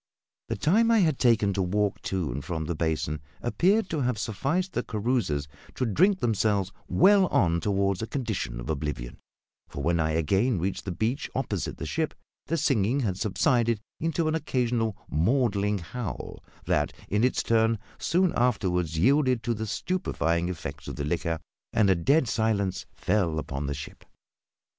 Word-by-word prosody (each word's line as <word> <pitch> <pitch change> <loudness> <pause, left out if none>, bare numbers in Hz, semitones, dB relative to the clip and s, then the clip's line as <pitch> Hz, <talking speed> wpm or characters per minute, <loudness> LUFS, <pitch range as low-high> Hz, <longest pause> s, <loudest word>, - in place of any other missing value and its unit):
The - - -2
time 200 - +3
I 230 - +5
had 155 -6 +2
taken 110 -5 +3
to 95 - 0
walk 100 +2 0
to 90 -8 -1
and 70 +4 -4
from 80 -3 -3
the 85 - -2
basin 75 -2 -1 0.2
appeared 190 - +2
to 155 -3 0
have 125 -3 0
sufficed 135 - -1
the - - 0
carousers 110 - -1 0.3
to 130 - 0
drink 185 - +3
themselves 105 -4 +1 0.2
well 190 - +5
on 85 - +2
toward 100 -1 +1
a 110 - -3
condition 110 - -3
of - - -7
oblivion; 75 -6 -3 0.5
for 70 - -6
when 85 +2 +2
I 80 -1 +1
again 95 - +2
reached 90 +3 -2
the 95 - -2
beach 110 +9 -1
opposite 115 -8 -2
the - - -5
ship, - - -2 0.3
the 165 - 0
singing 130 -2 +2
had 100 -7 0
subsided 115 +2 +1 0.2
into 165 0 0
an 155 - +1
occasional 120 -8 0
maudlin 105 - +1
howl 100 +4 -6 0.2
that, - - +1
in 105 +3 +1
its 125 - +2
turn, 115 0 +3 0.2
soon 180 +1 +2
afterwards 90 -9 +1
yielded 130 - +3
to 120 - 0
the 110 0 -4
stupefying 90 - -1
effects 85 -5 -6
of - - -5
the 70 - -3
liquor, 85 +1 -1 0.4
and 105 -3 +4
a - - +4
dead 135 - +3
silence 105 -4 0
fell 90 -7 0
upon 70 -2 -3
the 70 - -2
ship. 75 - -9
105 Hz, 165 wpm, -27 LUFS, 85-125 Hz, 0.5 s, I